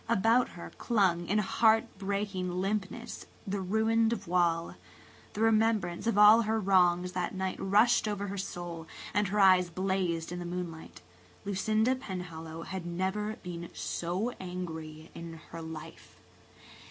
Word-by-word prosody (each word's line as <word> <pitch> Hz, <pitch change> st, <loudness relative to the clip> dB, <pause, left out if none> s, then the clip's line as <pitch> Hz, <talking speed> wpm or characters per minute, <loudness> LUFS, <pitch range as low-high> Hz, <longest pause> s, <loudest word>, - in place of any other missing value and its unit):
About 230 Hz, +3 st, +3 dB
her 170 Hz, -, -8 dB
clung, 185 Hz, -7 st, +2 dB
in 205 Hz, -, +1 dB
heart 220 Hz, +2 st, +3 dB
breaking 195 Hz, -2 st, -2 dB
limpness, 210 Hz, +4 st, -3 dB, 0.2 s
the 200 Hz, -1 st, -2 dB
ruined 220 Hz, +4 st, +2 dB
voile. 170 Hz, -5 st, 0 dB, 0.6 s
The 210 Hz, -, -4 dB
remembrance 220 Hz, -4 st, +2 dB
of 230 Hz, -, +1 dB
all 210 Hz, +2 st, +8 dB
her 220 Hz, 0 st, 0 dB
wrongs 180 Hz, -2 st, +3 dB
that 180 Hz, +1 st, -3 dB
night 190 Hz, 0 st, -2 dB
rushed 215 Hz, +4 st, +4 dB
over 205 Hz, -1 st, -2 dB
her 200 Hz, 0 st, -5 dB
soul, 175 Hz, -3 st, -6 dB, 0.3 s
and 205 Hz, 0 st, +2 dB
her 210 Hz, +3 st, -1 dB
eyes 185 Hz, -2 st, +6 dB
blazed 180 Hz, -2 st, -1 dB
in 175 Hz, -, -4 dB
the -, -, -4 dB
moonlight. 175 Hz, -2 st, -6 dB, 0.4 s
Lucinda 215 Hz, +5 st, +1 dB
Penhallow 165 Hz, -8 st, -6 dB
had 190 Hz, -1 st, -5 dB
never 190 Hz, +5 st, -2 dB
been 170 Hz, -2 st, -6 dB
so 180 Hz, +8 st, -2 dB
angry 160 Hz, -4 st, -7 dB
in 165 Hz, -1 st, -8 dB
her 165 Hz, -, -6 dB
life. 160 Hz, 0 st, -9 dB
190 Hz, 140 wpm, -30 LUFS, 175-210 Hz, 0.6 s, all